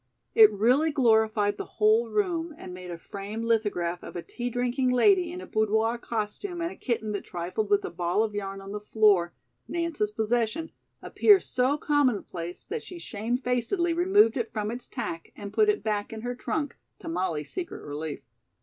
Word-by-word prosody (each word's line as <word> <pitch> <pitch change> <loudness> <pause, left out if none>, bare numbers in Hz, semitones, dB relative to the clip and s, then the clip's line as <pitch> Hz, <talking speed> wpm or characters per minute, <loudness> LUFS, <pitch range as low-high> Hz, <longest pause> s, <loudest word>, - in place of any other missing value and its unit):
It 440 -2 +8
really 250 +10 +3
glorified 220 -6 +3
the - - -7
whole 220 +2 +4
room 340 - -1
and 180 - -9
made 180 0 -8
a 170 - -5
framed 205 +6 -6
lithograph 200 -7 0
of - - -10
a 175 - -4
tea 245 0 -4
drinking 245 +2 0
lady 355 +7 +4
in 360 +1 -6
a - - -8
boudoir 220 +2 +1
costume 235 - -4
and 335 +1 -2
a - - -10
kitten 225 -4 -2
that 200 - -3
trifled 180 +5 -3
with 205 0 +3
a - - -5
ball 175 +4 +1
of 215 -2 -3
yarn 195 -1 -4
on 195 0 -9
the 210 - -4
floor, 210 -5 +3 0.4
Nance's 335 -11 -1
possession, 225 +7 -1 0.3
appear 410 -2 +5
so 260 -1 0
commonplace 235 - -1
that 455 +2 -4
she 360 - -10
shamefacedly 250 - -1
removed 350 - +4
it 235 -2 -2
from 210 0 -2
its 245 +1 -6
tack 165 0 -5
and 200 -1 -8
put 425 -1 +4
it 420 - +1
back 210 -2 -1
in 220 -1 -6
her 245 +1 -3
trunk, 290 +3 -3 0.2
to - - -11
Molly's 165 -3 -2
secret 360 -2 -5
relief. 150 +1 -5
225 Hz, 185 wpm, -27 LUFS, 205-290 Hz, 0.4 s, It